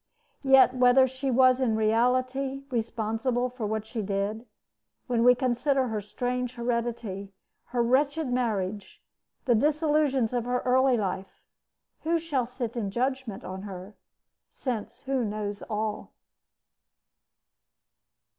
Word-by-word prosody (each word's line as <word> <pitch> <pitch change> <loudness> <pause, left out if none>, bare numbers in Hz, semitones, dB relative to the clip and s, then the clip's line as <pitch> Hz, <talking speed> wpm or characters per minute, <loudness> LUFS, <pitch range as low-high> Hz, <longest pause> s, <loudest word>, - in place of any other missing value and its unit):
Yet 270 -2 +6
whether 250 +1 +5
she 260 +1 -4
was 255 +1 +4
in 230 -4 +2
reality 255 +5 +1
responsible 235 +2 -1
for 240 -4 -4
what 215 0 -2
she 220 0 -4
did, 205 +3 -2 0.6
when 240 -2 +1
we 250 +1 +7
consider 255 +1 +1
her 215 -2 -2
strange 245 +4 -3
heredity, 235 -5 -3 0.3
her 240 -1 0
wretched 285 +5 +2
marriage, 210 -5 -2 0.5
the 250 - +4
disillusions 295 -2 +2
of 240 -1 -1
her 250 0 0
early 255 0 +4
life 190 -2 -4 0.6
who 335 +2 +1
shall 290 -7 -1
sit 245 -2 -5
in 215 -4 -2
judgment 255 -1 -2
on 190 +1 -6
her, 195 0 -8 0.6
since 240 -6 -5
who 270 -2 -1
knows 210 -1 -4
all? 215 0 -3
245 Hz, 120 wpm, -27 LUFS, 215-260 Hz, 0.6 s, we